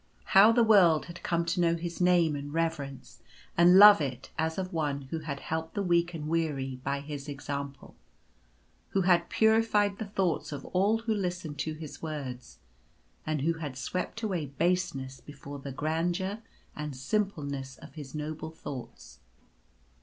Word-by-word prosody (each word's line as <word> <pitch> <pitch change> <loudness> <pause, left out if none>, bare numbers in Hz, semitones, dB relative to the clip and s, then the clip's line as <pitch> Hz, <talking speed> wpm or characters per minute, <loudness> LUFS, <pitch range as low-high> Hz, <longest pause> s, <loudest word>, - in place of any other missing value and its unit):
How 200 +4 +9
the 235 0 +4
world 185 -8 +5
had 170 0 -10
come 170 -1 0
to 170 +2 0
know 170 -1 +3
his 170 +1 -5
name 175 -4 +4
and 145 0 -6
reverence 160 -4 -3 0.3
and 175 +2 +7
love 205 -2 +10
it 130 -2 -4
as 160 0 -1
of 185 -1 -3
one 145 -3 -1
who 165 - -2
had 145 -3 -5
helped 160 0 -4
the 200 - 0
weak 175 -1 +2
and 150 -2 -5
weary 150 -5 -1
by 140 0 -1
his 145 0 -7
example; 140 0 -6 1.0
who 195 - +1
had 175 -2 +3
purified 220 -2 +3
the 220 - -4
thoughts 190 -7 -1
of 145 - -6
all 200 +4 +2
who 225 -1 +1
listened 180 -6 -3
to 155 - -2
his 155 -2 -9
words; 140 -6 -6 0.7
and 155 -2 -1
who 165 +2 0
had 145 -5 -5
swept 180 - -4
away 180 -8 -1
baseness 140 -4 -1
before 145 0 -9
the 135 0 -7
grandeur 175 - -1 0.4
and 150 -2 -5
simpleness 140 -5 -2
of - - -13
his 145 -3 -9
noble 155 +1 -4
thoughts. 125 - -9
160 Hz, 160 wpm, -29 LUFS, 140-180 Hz, 1.0 s, love